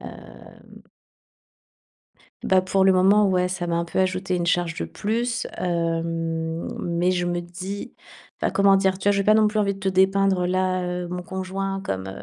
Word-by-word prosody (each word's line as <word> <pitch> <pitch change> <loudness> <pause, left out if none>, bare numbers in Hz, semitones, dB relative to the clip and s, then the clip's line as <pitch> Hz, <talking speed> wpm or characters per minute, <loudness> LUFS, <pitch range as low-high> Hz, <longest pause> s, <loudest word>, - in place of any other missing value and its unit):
Hem - - -13 1.6
Bah 190 -1 +3
pour 190 +1 +1
le 190 - +5
moment, 200 +3 +4
ouais, 180 -1 +1
ça 180 -1 -3
m'a 170 - -1
un 170 - 0
peu 170 - -3
ajouté 185 0 0
une 175 - -2
charge 175 -1 +1
de 85 - -3
plus, 235 - -2
hem, 165 -1 -2
mais 175 +1 0
je 175 -1 -1
me 175 0 -1
dis 180 +4 -7 0.5
heu, - - +1
comment 195 0 +5
dire? 190 -1 +1
Tu 200 - 0
vois, - - +5
je 200 - 0
vais 200 - +1
pas 215 - +6
non 215 0 +4
plus 215 0 -1
envie 200 -1 +1
de 195 - -12
te 190 0 0
dépeindre 190 -1 +2
là, 185 0 0
heu, 180 0 -3
mon 180 0 -4
conjoint 195 +1 -4
comme 95 - -4
185 Hz, 190 wpm, -23 LUFS, 175-195 Hz, 1.6 s, pas